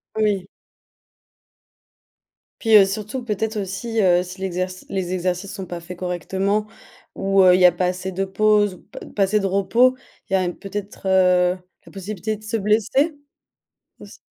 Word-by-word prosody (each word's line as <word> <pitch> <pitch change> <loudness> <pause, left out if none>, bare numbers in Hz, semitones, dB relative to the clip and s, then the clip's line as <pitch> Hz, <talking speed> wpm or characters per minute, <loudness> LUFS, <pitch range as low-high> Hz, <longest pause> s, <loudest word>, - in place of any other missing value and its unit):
Oui. 205 -4 0 2.1
Puis, 225 -2 +4
heu, 195 - +7
surtout 215 +6 -4
peut-être 220 0 -2
aussi, 215 +4 -2
heu, 180 -2 +4
si 185 +1 -10
l'exerci 185 0 -3
les 185 -2 -3
exercices 185 +1 -2
sont 190 - -6
pas 175 -1 -6
faits 175 +1 -9
correctement 190 +4 -1 0.5
ou 195 0 +2
heu, 180 -1 +7
il 185 - +2
y - - +7
a 180 - +8
pas 180 +1 -1
assez 185 +1 -3
de 195 +2 -2
pause 205 0 +2
ou - - -18
pa - - -11 0.2
pas 200 - +3
assez 210 +2 +2
de 195 - -2
repos, 230 +7 +3 0.3
il - - -4
y - - +5
a 190 - +3
un 180 -1 -1
peut-être, 200 +1 -7
heu, 180 -1 +3 0.3
la - - -15
possibilité 205 +2 -4
de 215 - -19
se 215 +1 -2
blesser? 220 - +1 0.9
Aussi. - - -13
195 Hz, 175 wpm, -21 LUFS, 185-210 Hz, 2.1 s, a